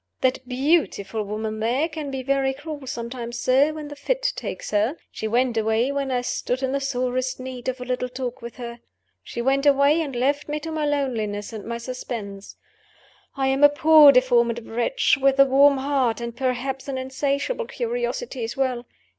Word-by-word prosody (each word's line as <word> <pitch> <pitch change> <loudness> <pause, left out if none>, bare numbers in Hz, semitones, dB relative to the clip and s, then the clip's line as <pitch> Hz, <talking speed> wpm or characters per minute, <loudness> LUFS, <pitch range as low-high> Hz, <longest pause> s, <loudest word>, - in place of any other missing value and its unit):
That 260 0 0
beautiful 250 - +1
woman 215 +1 -4
there 245 +8 +1
can 310 -3 -6
be 265 -1 -4
very 270 0 +1
cruel 290 -1 -8
sometimes, 235 -1 -5
sir, 265 +5 +3
when 305 -1 -7
the 290 - -8
fit - - -1
takes - - -6
her. 215 +7 +1 0.2
She 220 - -4
went 240 +1 +1
away 220 +4 +1
when 280 -1 -2
I 250 -1 0
stood 250 +1 -2
in 260 - 0
the 280 - 0
sorest 255 -1 -2
need 255 -1 -7
of 255 0 -4
a 250 - -6
little 250 0 -2
talk 255 0 -5
with 235 0 -8
her 235 -1 -7 0.4
she 235 - -5
went 275 +2 +2
away, 285 +3 +4
and 280 -5 -4
left 280 +5 0
me 300 +1 -2
to 325 +1 -5
my 310 -1 -1
loneliness 230 -8 -2
and 215 -2 -7
my 235 0 -3
suspense. 230 -5 -7 0.8
I 270 -1 +1
am 270 +2 +1
a 290 - +10
poor 300 0 +7
deformed 235 -3 +2
wretch, 245 - +1
with 275 0 +3
a 275 - +9
warm 275 +1 +5
heart, 265 -4 0
and, 235 -1 -5
perhaps, 260 +1 -2
an 270 -1 -3
insatiable 280 - -2
curiosity 485 - -3
as 225 +3 -5
well. 255 -3 -1
260 Hz, 190 wpm, -23 LUFS, 235-280 Hz, 0.8 s, a